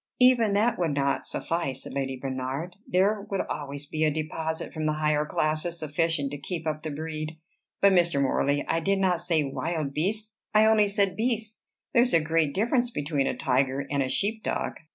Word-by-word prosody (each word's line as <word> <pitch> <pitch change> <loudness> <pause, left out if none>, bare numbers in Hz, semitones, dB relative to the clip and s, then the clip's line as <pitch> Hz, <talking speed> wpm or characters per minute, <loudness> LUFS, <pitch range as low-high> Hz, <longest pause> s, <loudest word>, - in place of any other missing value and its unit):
"Even 245 -4 +5
that 215 +3 +2
would 165 -5 0
not 140 -1 0
suffice," 150 -6 -2
said - - -8
Lady 135 -1 -2
Bernard. 135 +6 -4
"There 200 +3 +2
would 195 - 0
always 145 -1 -5
be 155 +2 -2
a 155 - +4
deposit 160 +1 -3
from 155 -1 -2
the 155 - +2
higher 150 0 +1
classes 155 +3 0
sufficient 155 -2 0
to 145 - -5
keep 165 +3 -5
up 155 -1 -2
the 155 - -4
breed. 155 +1 -5 0.4
But, 200 -1 +6
Mr. 170 -5 +3
Morley, 140 +1 +1
I 165 - +1
did 195 +4 +1
not 185 -3 +2
say 170 -3 +1
wild 145 +1 -3
beasts: 215 +7 -2 0.2
I 215 +1 +7
only 220 -1 +5
said 200 -2 +1
beasts. 225 -1 -2 0.3
There 235 - +6
is 245 -4 +3
a - - +6
great 160 -2 +1
difference 240 +4 +2
between 145 - -1
a 125 - -2
tiger 130 +2 +1
and 140 -1 +1
a 130 - 0
sheep 215 - -1
dog." - - -2
160 Hz, 195 wpm, -27 LUFS, 145-195 Hz, 0.4 s, I